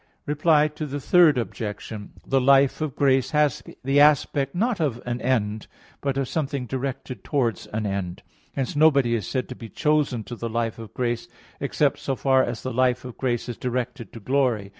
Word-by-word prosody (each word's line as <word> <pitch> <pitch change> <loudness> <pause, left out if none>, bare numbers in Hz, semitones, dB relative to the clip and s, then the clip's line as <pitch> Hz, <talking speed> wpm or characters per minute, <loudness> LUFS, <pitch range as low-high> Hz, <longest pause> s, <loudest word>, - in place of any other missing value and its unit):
Reply 150 +1 +3
Obj. 150 -2 -4
3: 115 - +1 0.2
The 135 -1 +2
life 140 +2 +4
of 155 -5 -2
grace 135 -2 +3
has 150 -3 +2 0.2
the 135 +2 +3
aspect, 145 -1 +3
not 225 +3 0
of 140 -7 0
an 120 0 -3
end, 110 -4 0 0.3
but 140 -1 -1
of 135 -2 0
something 140 -4 -2
directed 130 +1 -5
towards 125 -6 -1
an 110 0 -3
end. 95 -3 -3 0.3
Hence 135 -1 -2
nobody 140 -5 +4
is 105 -6 -1
said 130 +5 -2
to 125 - -6
be 115 -2 -10
chosen 150 -6 +1
to 120 - -7
the 115 0 -4
life 115 0 -2
of 115 -2 -10
grace, 120 -2 -1 0.3
except - - +1
so 135 - -2
far 130 0 +3
as 120 -2 -4
the 130 - -3
life 125 0 +1
of 125 - -8
grace 120 -3 -1
is 120 - -5
directed 125 -1 -3
to 115 - -8
glory. 120 -4 0
130 Hz, 180 wpm, -24 LUFS, 115-140 Hz, 0.3 s, life